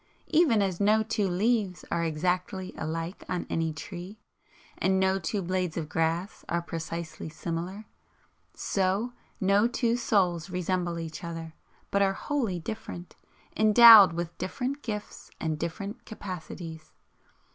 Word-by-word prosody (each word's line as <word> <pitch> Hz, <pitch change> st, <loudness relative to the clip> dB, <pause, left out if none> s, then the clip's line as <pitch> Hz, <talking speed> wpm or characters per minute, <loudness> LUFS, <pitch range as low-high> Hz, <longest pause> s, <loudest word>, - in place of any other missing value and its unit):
Even 280 Hz, -11 st, +4 dB
as 185 Hz, -3 st, -2 dB
no 215 Hz, +2 st, +4 dB
two 210 Hz, -2 st, 0 dB
leaves 195 Hz, 0 st, 0 dB
are 170 Hz, 0 st, +1 dB
exactly 180 Hz, +3 st, -1 dB
alike 165 Hz, +3 st, -4 dB
on 180 Hz, -1 st, -2 dB
any 165 Hz, -1 st, 0 dB
tree, 180 Hz, +6 st, -8 dB, 0.6 s
and 190 Hz, 0 st, +2 dB
no 190 Hz, 0 st, +2 dB
two 195 Hz, +3 st, -2 dB
blades 180 Hz, -2 st, -1 dB
of 155 Hz, -2 st, -3 dB
grass 165 Hz, +4 st, -1 dB
are 170 Hz, -, +1 dB
precisely 165 Hz, -1 st, -5 dB
similar, 170 Hz, +6 st, -5 dB, 0.7 s
so 195 Hz, +5 st, 0 dB, 0.3 s
no 200 Hz, +3 st, +4 dB
two 240 Hz, -1 st, +1 dB
souls 190 Hz, -7 st, +1 dB
resemble 180 Hz, -1 st, -1 dB
each 165 Hz, 0 st, -6 dB
other, 165 Hz, -1 st, -6 dB, 0.4 s
but 200 Hz, -, +2 dB
are 195 Hz, -1 st, +3 dB
wholly 235 Hz, -6 st, -1 dB
different, 180 Hz, -2 st, -7 dB, 0.4 s
endowed 215 Hz, -3 st, +9 dB
with 170 Hz, 0 st, -4 dB
different 270 Hz, +7 st, -3 dB
gifts 210 Hz, -4 st, -6 dB
and 155 Hz, -2 st, -2 dB
different 200 Hz, +8 st, -5 dB
capacities. 170 Hz, -6 st, -8 dB
185 Hz, 130 wpm, -28 LUFS, 170-210 Hz, 0.7 s, endowed